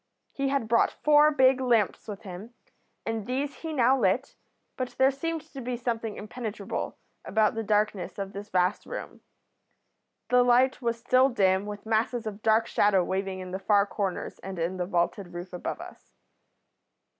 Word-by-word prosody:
He 275 -1 -1
had 275 -5 0
brought 230 +1 +2
four 300 0 +6
big 265 -3 +4
lamps 235 -6 +1
with 205 -2 -7
him, 200 +5 -9 0.5
and 225 -1 -3
these 275 +3 -2
he 320 - -5
now 260 -3 +4
lit, 245 +2 0 0.4
but 255 -1 -3
there 265 +1 +5
seemed 325 +4 -3
to 270 - -6
be 245 0 -3
something 230 -3 -3
impenetrable 215 -1 -5 0.3
about 215 -1 +2
the 225 - -2
darkness 210 -2 0
of 195 -1 -5
this 205 +1 -7
vast 180 +2 +1
room. - - -7 1.1
The 250 0 +5
light 245 +2 +3
was 235 -1 0
still 255 +3 +4
dim, 195 -4 +2
with 205 0 -7
masses 225 +2 0
of 215 -1 -6
dark 220 +1 +3
shadow 200 -3 +3
waving 190 0 -2
in 185 0 -7
the 190 - -3
far 200 +1 +3
corners 200 -3 -3
and 190 -1 -7
in 170 +3 -2
the 180 -1 -2
vaulted 175 0 -1
roof 175 +1 -7
above 180 - -4
us. - - -12
220 Hz, 170 wpm, -27 LUFS, 195-250 Hz, 1.1 s, four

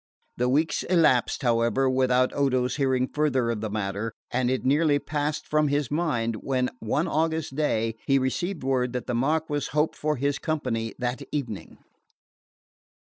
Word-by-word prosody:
The 125 +1 +1
weeks 155 +5 +1
elapsed, 155 -11 +2
however, 120 +2 +2
without 130 -1 +2
Odo's 130 -2 +1
hearing 130 -2 +1
further 130 -6 +1
of 110 -3 -3
the 110 - -2
matter, 105 +1 -3 0.2
and 125 0 +1
it 130 0 0
had - - -12
nearly 145 +2 +3
passed 150 +1 -2
from 155 0 +2
his 145 -2 0
mind 120 -9 0
when 130 +1 -1
one 145 +10 0
August 160 -2 -1
day 115 -7 0
he 135 - +4
received 155 +6 -2
word 130 -2 0
that 125 - -3
the 125 - -3
Marquess 145 +3 0
hoped 150 +1 +2
for 150 0 -1
his 140 +1 -1
company 115 -8 -2
that 125 +2 -2
evening. 125 -9 -4
130 Hz, 160 wpm, -26 LUFS, 125-150 Hz, 0.2 s, he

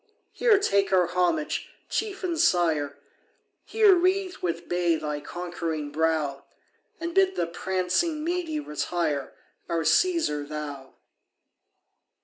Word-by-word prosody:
Here 465 -4 +4
take 200 - +1
our 185 -2 +4
homage, 175 -3 0 0.2
Chief 405 -3 -3
and 340 -3 -1
Sire; 160 - +2 0.7
Here 430 -3 +5
wreathe 370 +1 +1
with 170 -1 -3
bay 175 -1 +2
thy 150 -1 -3
conquering 165 -2 -4
brow, 155 -3 0 0.6
And 335 +1 -4
bid 385 0 +3
the - - 0
prancing 190 - -1
Mede 330 -3 -2
retire, 150 -2 -2 0.4
Our 165 -1 0
Caesar 160 - +2
thou! 145 -2 -7
175 Hz, 115 wpm, -26 LUFS, -, 0.7 s, Here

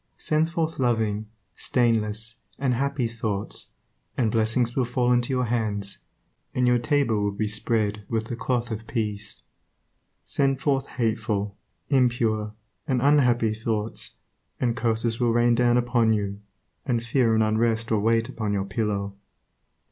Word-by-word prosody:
Send 155 +1 +1
forth 165 -2 -2
loving, 110 -4 +1 0.3
stainless, 110 -1 0 0.2
and 135 -2 +1
happy 140 +1 0
thoughts, 110 -3 -4 0.5
and 115 -4 +2
blessings 115 +2 +1
will 130 - +2
fall 125 0 +1
into 120 0 +1
your 125 -1 +1
hands, 105 -4 -1 0.6
and 125 - +2
your 125 0 +4
table 120 -5 +1
will 100 0 +1
be 105 +2 -2
spread 105 -1 0
with 110 -1 -1
the 120 - -4
cloth 120 0 -1
of 110 +1 -5
peace. 105 -3 -4 0.8
Send 135 -1 +1
forth 135 -1 0
hateful, 110 -4 -1 0.3
impure, 115 -5 +1 0.3
and 130 -4 +1
unhappy 125 -5 +3
thoughts, 110 -1 -2 0.4
and 120 -2 +1
curses 115 -1 0
will 120 -2 +2
rain 120 0 +4
down 120 0 +3
upon 120 -2 +3
you, 100 -1 -2 0.4
and 120 -4 0
fear 115 -1 +2
and 110 - +4
unrest 115 +1 +1
will 110 -2 +2
wait 115 +1 +2
upon 110 -5 -3
your 100 -1 0
pillow. 100 -1 -2
115 Hz, 145 wpm, -25 LUFS, 110-125 Hz, 0.8 s, your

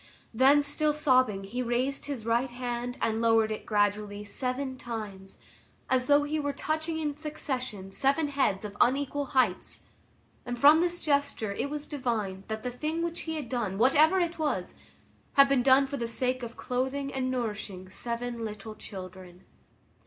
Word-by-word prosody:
Then 270 +5 +5
still 300 +1 +1
sobbing, 255 -9 +3
he 230 +6 -4
raised 250 +4 -1
his 265 -7 -5
right 235 +3 +1
hand 245 0 -4
and 225 0 +1
lowered 225 -1 +4
it 215 - -5
gradually 205 -1 0
seven 255 +5 -3
times, 210 -6 -6 0.5
as 255 -1 +2
though 290 0 +5
he 305 +1 -1
were 285 -1 -1
touching 315 +3 -2
in 300 -2 -2
succession 255 - -4
seven 280 +7 +2
heads 265 -8 0
of 205 -1 -7
unequal 285 +2 +2
heights, 215 -8 +1 0.6
and 245 0 -4
from 295 +5 +7
this 350 0 0
gesture 280 -7 0
it 240 +7 -2
was 295 0 -4
divined 220 -9 -3
that 220 0 -4
the 250 - -2
thing 310 +6 -2
which 340 0 -3
he 320 -1 -4
had 300 -5 -4
done, 225 -7 -2
whatever 300 - +5
it 345 -2 -1
was, 305 -2 -1 0.6
he 275 - +9
had 275 -2 +2
done 265 +2 +5
for 280 +1 -4
the 235 - -2
sake 255 +2 -1
of 235 -1 -7
clothing 265 +2 -2
and 255 -1 -1
nourishing 210 -6 -4
seven 235 +3 -4
little 215 0 -6
children. 185 -3 -10
255 Hz, 165 wpm, -29 LUFS, 220-285 Hz, 0.6 s, he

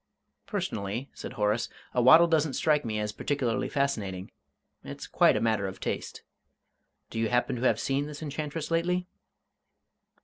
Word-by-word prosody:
"Personally," 100 +7 -3
said - - -7
Horace, 105 +2 0 0.2
"a 125 - +2
waddle 160 +8 +8
doesn't 160 -4 +1
strike 150 -2 +2
me 110 -2 -2
as 105 0 -1
particularly 130 0 -1
fascinating 105 -10 -2 0.5
it's - - -7
quite - - +4
a - - +1
matter 110 -3 +1
of 95 - -7
taste. - - -4 0.9
Do 115 - -3
you 115 -1 +1
happen 125 0 +1
to - - -5
have 130 - +3
seen 140 +2 0
this 150 +1 -8
enchantress 150 +1 -4
lately?" 180 +2 +1
130 Hz, 150 wpm, -28 LUFS, 110-150 Hz, 0.9 s, waddle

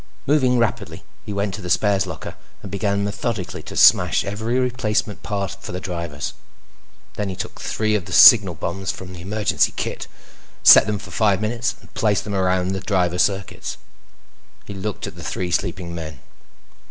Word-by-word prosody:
Moving 130 -4 +3
rapidly, 115 -4 -2 0.2
he - - -4
went 100 -1 -2
to 105 - -6
the 90 - -6
spares 100 +1 +2
locker - - -7 0.3
and 100 - -8
began 100 0 -1
methodically 105 -1 -3
to - - -9
smash - - +5
every 110 +5 -2
replacement 115 -4 -1
part 100 -3 -3
for - - -7
the 90 - -3
drivers. 85 -6 -5 0.8
Then 105 -1 -2
he 95 - -5
took - - -7
three 110 -1 -1
of 100 -5 -1
the - - -10
signal 100 -7 +8
bombs 95 +4 -4
from 90 -1 -9
the 85 - -9
emergency 105 +3 0
kit, - - -4 0.6
set - - +9
them 105 -1 -1
for 105 - -11
five 100 -4 +2
minutes, 115 +3 -2
and - - -20
placed 105 -2 +1
them 105 - -5
around 95 -1 +1
the 95 0 -2
driver 90 -2 0
circuits. 95 0 -1 0.9
He 100 - -8
looked 100 +1 -5
at - - -8
the - - -9
three 90 -1 -3
sleeping 85 -1 -2
men. 80 -4 -7
100 Hz, 175 wpm, -21 LUFS, 90-105 Hz, 0.9 s, set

